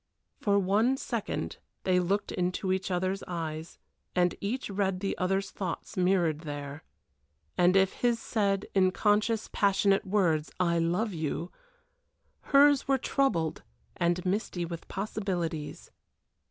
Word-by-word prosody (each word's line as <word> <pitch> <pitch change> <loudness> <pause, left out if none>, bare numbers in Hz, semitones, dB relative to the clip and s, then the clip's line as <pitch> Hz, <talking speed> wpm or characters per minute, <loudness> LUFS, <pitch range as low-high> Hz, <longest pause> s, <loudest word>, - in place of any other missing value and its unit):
For 200 -1 +2
one 210 +7 +2
second 235 -5 -3 0.3
they 185 -1 +3
looked 195 +3 0
into 180 +1 -1
each 190 0 -2
other's 185 +2 -1
eyes, 160 -1 -5 0.4
and 180 -1 +3
each 240 +6 -2
read 195 -2 -1
the 195 0 -2
other's 195 +2 0
thoughts 195 +2 -5
mirrored 180 -4 +2
there; 145 -1 -6 0.7
and 180 +1 +4
if 195 -1 +4
his 240 -1 +3
said, 200 -4 0
in 190 -2 +4
conscious, 210 +3 +1
passionate 195 0 +2
words, 175 -6 +2
"I 170 -2 +2
love 180 +6 0
you," 160 +1 -3 1.0
hers 285 0 +5
were 270 -1 +3
troubled 205 - 0 0.3
and 175 +1 0
misty 185 -2 -1
with 170 -1 -7
possibilities. 180 -6 -3
190 Hz, 125 wpm, -29 LUFS, 175-205 Hz, 1.0 s, hers